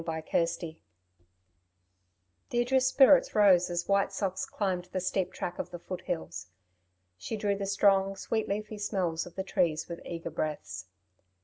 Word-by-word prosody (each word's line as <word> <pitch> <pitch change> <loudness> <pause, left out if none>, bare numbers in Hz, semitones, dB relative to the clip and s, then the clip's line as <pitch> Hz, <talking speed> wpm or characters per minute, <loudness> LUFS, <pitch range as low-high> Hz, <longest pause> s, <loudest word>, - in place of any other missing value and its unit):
CHAPTER 160 -1 -2
XXX 165 -1 -1 1.7
Deirdre's 255 +2 +2
spirits 270 +1 +5
rose 190 -4 +5
as 175 0 -2
White 200 0 +2
Socks 190 -2 -2
climbed 185 -3 -2
the 185 +1 -4
steep 185 0 -1
track 175 - -5
of - - -3
the 175 - -7
foothills. 170 - -5 0.7
She 220 - -4
drew 205 -1 0
the 195 0 -4
strong, 195 -1 +3
sweet 220 +3 -2
leafy 210 +1 -3
smells 180 -5 -1
of 175 - -13
the 190 - -2
trees 170 -5 0
with 170 -1 -7
eager 170 -1 -6
breaths. 150 - -4
185 Hz, 145 wpm, -30 LUFS, 170-205 Hz, 1.7 s, spirits